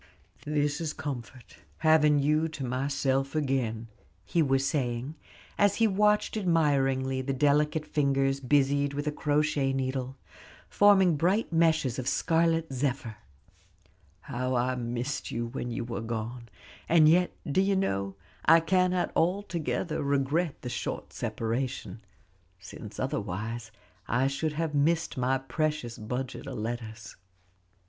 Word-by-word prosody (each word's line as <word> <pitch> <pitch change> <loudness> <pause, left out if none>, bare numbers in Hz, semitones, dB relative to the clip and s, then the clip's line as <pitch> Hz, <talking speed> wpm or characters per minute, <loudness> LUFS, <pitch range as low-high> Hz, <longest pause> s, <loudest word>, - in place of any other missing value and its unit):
"This 150 +1 0
is 155 -2 -2
comfort, 125 -3 -7 0.2
having 155 -2 +4
you 150 +3 +2
to 155 -4 -6
myself 135 +2 -1
again," 130 -6 -1 0.4
he 165 +11 +1
was 135 -2 +2
saying, 130 -1 -1 0.5
as 205 -1 +4
he 230 - +3
watched 210 +1 +2
admiringly 135 -8 +1
the 135 +1 -2
delicate 150 +2 +2
fingers 135 -2 +1
busied 140 +1 +2
with 145 +1 -3
a 150 - 0
crochet 150 -2 +1
needle, 130 0 -2 0.5
forming 195 -5 +5
bright 185 +5 +1
meshes 160 -6 +2
of 130 - -4
scarlet 165 0 +1
zephyr. 125 -4 -2 1.0
"How 125 +3 -2
I 125 +1 +1
missed 120 +2 -3
you 120 0 -2
when 120 +1 -5
you 120 0 -3
were 115 -1 -4
gone! 115 +1 -5 0.4
and 160 -2 +6
yet, 175 +3 +4
do 150 +6 +2
you 195 0 +2
know, 100 - -1 0.3
I 165 +1 +7
cannot 180 +2 +1
altogether 175 -2 -1
regret 140 +3 0
the 125 - -4
short - - -4
separation, 120 0 -3 0.6
since 100 +3 -10
otherwise 115 -3 -3 0.4
I 125 +3 +1
should 140 +3 -1
have 160 0 -2
missed 160 +3 +1
my 130 +1 +1
precious 140 -3 -2
budget 125 +5 -5
of 135 -3 -5
letters." 115 0 -6
140 Hz, 130 wpm, -28 LUFS, 125-160 Hz, 1.0 s, I